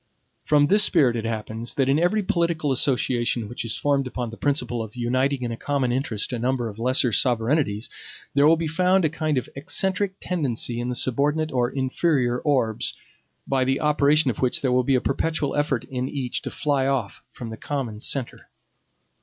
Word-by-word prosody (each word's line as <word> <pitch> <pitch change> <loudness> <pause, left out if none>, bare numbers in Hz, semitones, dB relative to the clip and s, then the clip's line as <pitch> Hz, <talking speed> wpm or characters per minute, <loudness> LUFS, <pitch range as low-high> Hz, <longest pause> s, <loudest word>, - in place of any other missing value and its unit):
From 145 -1 +4
this 205 +7 +4
spirit 145 - +4
it 115 -1 -3
happens, 110 +1 -4
that 135 -2 +1
in 140 +3 +3
every 205 +5 +2
political 170 -5 0
association 120 -3 0
which 120 - -5
is 115 -2 -2
formed 140 -2 +1
upon 125 -2 -4
the - - -8
principle 125 -4 -1
of 110 0 -8
uniting 130 +2 0
in 120 - -2
a - - -3
common 135 0 -1
interest 120 -3 -2
a 120 - -2
number 125 0 0
of 105 +1 -11
lesser 125 0 +2
sovereignties, 115 -1 +1 0.5
there 140 +1 +5
will 165 - +6
be 165 - -2
found 180 +3 +2
a - - +3
kind 155 -2 -1
of 125 - -2
eccentric 190 +7 0
tendency 125 -8 -2
in 120 +1 -3
the 125 - -2
subordinate 145 +6 0
or 125 -2 +1
inferior 130 -2 0
orbs, 125 -7 0 0.5
by 135 -1 +1
the 135 +1 0
operation 150 -1 +3
of 110 - -9
which 130 +1 0
there 130 - +2
will 125 0 +3
be 135 +1 +2
a 125 - +2
perpetual 150 0 -1
effort 145 -5 0
in 130 0 -4
each 130 -4 -3
to - - -5
fly 140 -3 0
off 125 -8 -2
from 115 -2 -8
the - - -5
common 125 -5 -4
centre. 130 +2 -3
130 Hz, 195 wpm, -24 LUFS, 120-150 Hz, 0.5 s, will